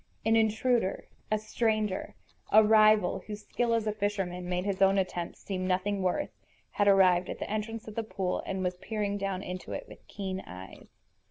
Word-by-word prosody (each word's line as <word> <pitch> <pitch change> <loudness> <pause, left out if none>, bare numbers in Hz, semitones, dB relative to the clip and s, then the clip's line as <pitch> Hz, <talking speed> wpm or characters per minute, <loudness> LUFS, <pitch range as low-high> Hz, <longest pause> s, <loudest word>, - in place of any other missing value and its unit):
An 225 0 +4
intruder, 220 -1 +1 0.2
a 215 - +2
stranger, 215 -2 -1 0.4
a 215 +1 +8
rival 215 -3 +5
whose 210 -1 -7
skill 235 -1 0
as 225 -1 0
a 215 - +1
fisherman 195 -4 -2
made 180 +1 -1
his 200 -2 -2
own 195 0 +5
attempts 180 -2 -3
seem 185 -2 -3
nothing 190 +2 0
worth, 185 +11 0 0.4
had 205 - +1
arrived 185 -2 +5
at - - -4
the - - -5
entrance 215 +1 -4
of 215 - -7
the 230 - -1
pool 195 -4 -2
and 190 -1 -2
was 180 0 -1
peering 205 0 -2
down 195 -1 -2
into 180 0 -6
it - - -5
with - - -13
keen 190 -2 -4
eyes. 90 +1 -10
200 Hz, 185 wpm, -29 LUFS, 185-215 Hz, 0.4 s, a